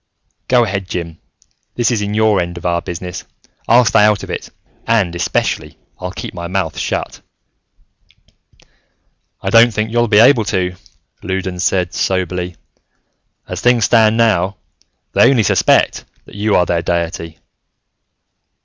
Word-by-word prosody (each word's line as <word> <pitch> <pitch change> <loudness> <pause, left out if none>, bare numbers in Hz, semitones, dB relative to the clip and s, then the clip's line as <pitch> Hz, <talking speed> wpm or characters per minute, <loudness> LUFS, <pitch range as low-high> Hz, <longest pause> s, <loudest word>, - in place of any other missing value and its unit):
"Go 125 -1 +4
ahead, 100 -3 -3
Jim, 85 -2 -5 0.6
this 120 0 +1
is 115 -3 0
your 105 -1 +1
end 85 0 -5
of 85 - -9
our 85 -1 0
business. 90 +1 -6 0.4
I'll 120 +1 +5
stay 105 - +4
out 105 -1 +2
of - - -7
it - - -5 0.4
and, 105 -7 +1
especially, 85 0 -2 0.2
I'll - - -5
keep - - -7
my 85 -1 -6
mouth 90 -3 -2
shut." - - -3 2.2
"I - - -2
don't 115 +1 +6
think 110 0 -2
you'll 120 0 +2
be 105 -2 +3
able 115 0 +5
to," 90 -2 -1 0.5
Loudons 95 -1 -3
said 90 -3 0
soberly. 90 -1 -2 0.9
"As - - -5
things 120 -2 +3
stand 110 -1 +4
now, 100 -4 +1 0.6
they - - +5
only 125 -5 +3
suspect - - +2 0.2
that - - -16
you 105 +1 0
are 90 - +3
their 85 -1 0
deity. 85 -1 -3
95 Hz, 140 wpm, -16 LUFS, 90-110 Hz, 2.2 s, don't